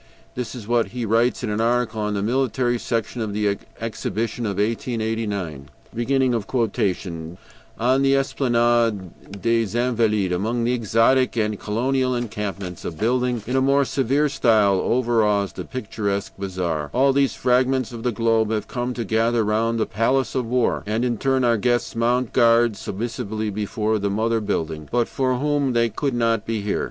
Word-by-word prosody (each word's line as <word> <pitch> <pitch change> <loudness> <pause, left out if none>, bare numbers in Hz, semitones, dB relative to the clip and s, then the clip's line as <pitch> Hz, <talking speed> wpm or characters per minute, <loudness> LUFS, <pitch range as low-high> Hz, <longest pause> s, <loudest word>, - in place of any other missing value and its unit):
This 125 -1 -5
is 110 -4 -8
what 120 -1 +2
he 120 -1 -4
writes 115 +4 +1
in 110 - -1
an 105 +2 -1
article 115 -1 0
on 105 0 -1
the 100 - -1
Military 125 0 0
Section 115 +1 -2
of 105 -2 -3
the 100 -1 0 0.2
Exhibition 115 +1 -3
of 100 -2 -3
1889: 105 - -2 2.1
"On 130 +2 +3
the 135 0 +4
Esplanade 120 - 0
des 115 -1 +1
Invalides, 110 -6 +1
among 110 +6 -1
the 120 +2 +1
exotic 120 +2 +2
and 105 -2 0
colonial 130 +4 0
encampments, 105 -6 -4
a - - -2
building 120 +6 0
in 125 - -2
a 130 - +3
more 140 +1 +3
severe 135 +3 +1
style 110 -8 +3
overawes 110 -5 +1
the - - -6
picturesque 105 -5 -3
bazaar; 90 -6 -3
all 135 +2 +4
these 140 -1 +2
fragments 130 0 +1
of 115 -1 -7
the 125 +1 0
globe 115 -1 +1
have 110 -2 -2
come 125 0 -3
to 120 - -2
gather 115 +2 +2
round 115 +2 0
the 110 - +2
Palace 130 +6 0
of 125 -3 -1
War, 125 0 +1
and 110 +3 0
in 120 -3 -1
turn 135 -1 +1
our 120 -1 +3
guests 120 +2 0
mount 120 +1 +1
guard 115 -2 +4
submissively 110 +1 -4
before 105 +1 -1
the 100 0 -1
mother 110 +3 0
building, 80 -7 -3
but 120 -1 +1
for 130 -1 0
whom 145 -1 0
they 115 -2 +1
would 140 -4 0
not 115 -2 +1
be 110 -1 -2
here. 105 - -1
115 Hz, 165 wpm, -22 LUFS, 105-125 Hz, 2.1 s, the